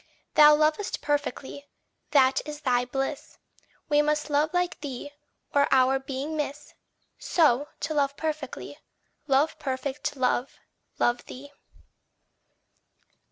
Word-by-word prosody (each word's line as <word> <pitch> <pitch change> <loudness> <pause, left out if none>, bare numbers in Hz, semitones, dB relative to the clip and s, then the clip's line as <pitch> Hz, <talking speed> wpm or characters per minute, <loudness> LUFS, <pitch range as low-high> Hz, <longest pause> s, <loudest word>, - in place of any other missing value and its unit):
Thou 300 0 +8
lovest 310 +6 0
perfectly 285 -1 -3 0.4
that 265 -2 +4
is 300 0 -8
thy 250 -3 +1
bliss: 270 +3 -4 0.5
We 295 -1 +4
must 300 0 -1
love 295 +2 +2
like 355 0 -1
thee, 285 0 -6 0.4
or 285 0 +4
our 265 0 +4
being 270 +3 -5
miss 295 -1 -4 0.5
So, 295 -4 +2
to 315 - -2
love 285 -1 0
perfectly, 310 -4 -5 0.5
love 280 +3 +2
perfect 280 +1 -3
Love, 255 0 0 0.4
love 240 0 +1
thee. 280 +3 -10
285 Hz, 115 wpm, -26 LUFS, 265-300 Hz, 0.5 s, Thou